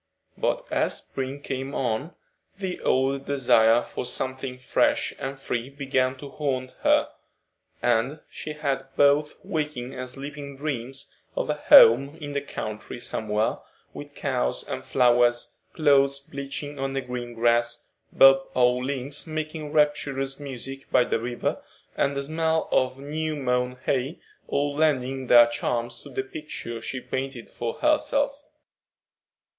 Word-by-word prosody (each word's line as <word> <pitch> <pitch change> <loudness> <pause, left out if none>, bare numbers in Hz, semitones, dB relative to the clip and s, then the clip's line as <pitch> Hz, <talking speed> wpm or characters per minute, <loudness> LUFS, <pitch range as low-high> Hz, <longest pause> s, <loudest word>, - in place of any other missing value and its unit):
But - - -1
as - - +1
spring 135 +1 -5
came 135 0 -4
on, 130 +6 -2 0.4
the 190 -2 -4
old 135 +1 +1
desire 120 -4 +4
for - - -5
something 130 +1 -3
fresh 125 - +1
and 135 0 -5
free 125 -1 -3
began 135 -2 0
to 140 - -9
haunt 130 -4 -2
her, - - +3 0.7
and 120 +5 +1
she 155 - -7
had 140 -3 -2
both 145 +1 +4
waking 150 -8 -3
and 130 -1 -6
sleeping 140 +1 -7
dreams 135 -2 -4 0.2
of - - 0
a - - +2
home 140 0 +7
in 145 -2 -6
the 140 0 -1
country 110 -4 -6
somewhere, 110 -2 -1 0.3
with - - -9
cows 60 0 -1
and - - -5
flowers, 120 -1 +3 0.2
clothes 140 -3 +4
bleaching 140 +1 -6
on 135 0 -2
green 120 -1 -5
grass, 120 0 +2 0.3
bob 135 0 +6
o' 125 -1 +5
links 135 +3 -3
making 155 -1 -4
rapturous 145 -3 +1
music 135 -1 -7
by 125 - +5
the 120 - -1
river, 120 +1 -2 0.3
and 140 0 +1
the 140 - -1
smell 160 +2 0
of 130 0 +2
new 155 +3 -3
mown 125 -2 0
hay, 135 +4 -1 0.3
all 145 0 0
lending 135 -4 +1
their 120 -1 +9
charms 120 0 -2
to 145 - -11
the 130 0 -3
picture 130 -5 -7
she 130 +3 -3
painted 130 -1 -4
for 115 -1 -4
herself. 290 -1 +1
135 Hz, 140 wpm, -25 LUFS, 125-145 Hz, 0.7 s, their